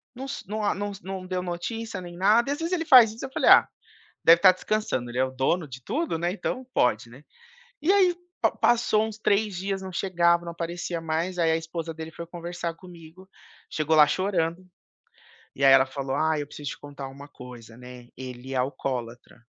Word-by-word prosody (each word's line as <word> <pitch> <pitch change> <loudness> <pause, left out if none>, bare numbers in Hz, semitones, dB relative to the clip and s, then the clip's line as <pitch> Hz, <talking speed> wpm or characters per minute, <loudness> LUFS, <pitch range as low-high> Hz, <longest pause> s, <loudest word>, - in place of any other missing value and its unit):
Não 265 +2 -6
s - - -6
não 215 +1 -3
a 200 - +1
não 205 +1 -4
não 190 -1 -6
deu 185 0 -3
notícia 185 +4 -5
nem 175 -1 -10
nada 215 +8 +3
e, - - +1
às 290 - -3
vezes, 335 +2 -3
ele 335 -2 0
faz 240 -7 +7
isso 230 +4 -9
eu - - -13
falei: - - +3
"Ah, - - +8 0.6
deve 165 +1 +8
estar 185 - +8
descansando. 185 - -2
Ele 125 - -5
é 130 - +4
o 130 - -4
dono 140 +6 -1
de 130 -1 -9
tudo, 305 - -2
né. 175 +2 -1
Então 255 +5 -4
pode, 115 -1 +1
né?" 135 +5 -15 0.6
E 325 +6 +3
aí, 370 -3 +4 0.2
pa - - +3
passou 230 -2 +2
uns 220 -1 -8
3 210 -1 +1
dias 195 +1 -3
não 190 - -7
chegava, 170 -2 +2
não 170 - -5
aparecia 170 0 -4
mais. 165 +3 -2
Aí 165 -1 +3
a - - +2
esposa 165 0 -5
dele 160 0 -7
foi 170 - -8
conversar 170 0 -5
comigo. 175 +1 -14 0.4
Chegou 155 0 0
lá 150 - +8
chorando. 185 -2 -1 0.9
E 140 - -3
aí, 135 - +7
ela 135 0 +6
falou: 135 0 -4
"Ai, 155 -1 +1
eu 145 - -6
preciso 145 -2 -7
te - - -8
contar 140 -1 -8
uma 140 +2 -11
coisa, 120 -4 -12
né. 125 -1 -12
Ele 130 0 -8
é - - -3
alcoólatra". 125 -3 -4
170 Hz, 210 wpm, -26 LUFS, 140-200 Hz, 0.9 s, Ah